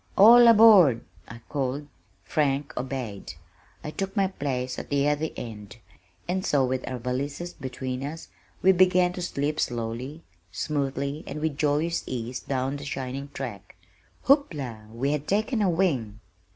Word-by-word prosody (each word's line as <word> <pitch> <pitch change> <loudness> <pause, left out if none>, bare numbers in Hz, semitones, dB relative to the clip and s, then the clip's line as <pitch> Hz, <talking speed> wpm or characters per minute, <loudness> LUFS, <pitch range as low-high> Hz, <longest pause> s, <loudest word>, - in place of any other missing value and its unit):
"All 235 +4 +9
aboard," 210 - +7 0.3
I 115 0 -11
called. 140 0 -2 0.4
Frank 145 -1 -1
obeyed. 125 -6 -5 0.5
I 150 - -5
took 195 +5 -4
my 195 - +4
place 130 -7 -3
at - - -8
the 140 0 +2
other 150 +2 0
end, 105 -2 -8 0.5
and 185 +2 -1
so 140 -6 +2
with 130 0 -3
our 130 - -3
valises 140 +8 -4
between 130 -1 -5
us, 155 +4 -7 0.3
we 190 - +7
began 180 -1 +4
to 180 - -6
slip 150 -2 -2
slowly, 120 +6 -3 0.3
smoothly, 140 - -2
and 145 - -5
with 155 -2 -1
joyous 150 +3 0
ease 125 0 -4
down 135 +1 -2
the 145 - -9
shining 135 0 -5
track! 110 -8 -7 0.5
Hoopla! 140 - +1
We 130 +5 -1
had 150 0 -2
taken 215 +4 0 0.2
wing! 125 - 0
140 Hz, 145 wpm, -26 LUFS, 125-165 Hz, 0.5 s, All